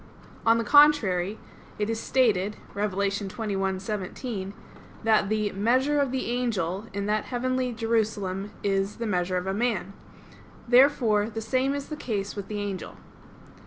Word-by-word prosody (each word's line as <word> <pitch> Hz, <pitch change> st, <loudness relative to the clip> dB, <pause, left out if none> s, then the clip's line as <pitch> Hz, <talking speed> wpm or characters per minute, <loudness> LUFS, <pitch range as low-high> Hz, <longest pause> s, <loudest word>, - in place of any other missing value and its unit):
On 230 Hz, 0 st, +6 dB
the 230 Hz, -, 0 dB
contrary, 220 Hz, -9 st, +4 dB, 0.4 s
It 210 Hz, -, -1 dB
is 225 Hz, 0 st, -2 dB
stated 210 Hz, -7 st, +2 dB, 0.2 s
(Apoc. 200 Hz, -1 st, 0 dB
21:17) 195 Hz, 0 st, -3 dB, 0.5 s
that 215 Hz, -3 st, +3 dB
the 215 Hz, -1 st, 0 dB
"measure 255 Hz, +8 st, +2 dB
of 275 Hz, -3 st, +1 dB
the 260 Hz, 0 st, -2 dB
angel" 215 Hz, -5 st, -1 dB
in 200 Hz, 0 st, -3 dB
that 210 Hz, +1 st, 0 dB
heavenly 255 Hz, 0 st, -1 dB
Jerusalem 215 Hz, -4 st, -1 dB
is 195 Hz, 0 st, 0 dB
"the 235 Hz, -, -4 dB
measure 185 Hz, -3 st, 0 dB
of 180 Hz, -, -3 dB
a 190 Hz, -, -1 dB
man." 205 Hz, -4 st, -1 dB, 0.7 s
Therefore 240 Hz, -4 st, +4 dB
the 225 Hz, 0 st, -5 dB
same 260 Hz, +5 st, 0 dB
is 280 Hz, -1 st, -5 dB
the 305 Hz, -, -4 dB
case 205 Hz, -8 st, -3 dB
with 200 Hz, -2 st, -6 dB
the 210 Hz, -, -4 dB
angel. 200 Hz, -2 st, -4 dB
215 Hz, 145 wpm, -26 LUFS, 195-245 Hz, 0.7 s, On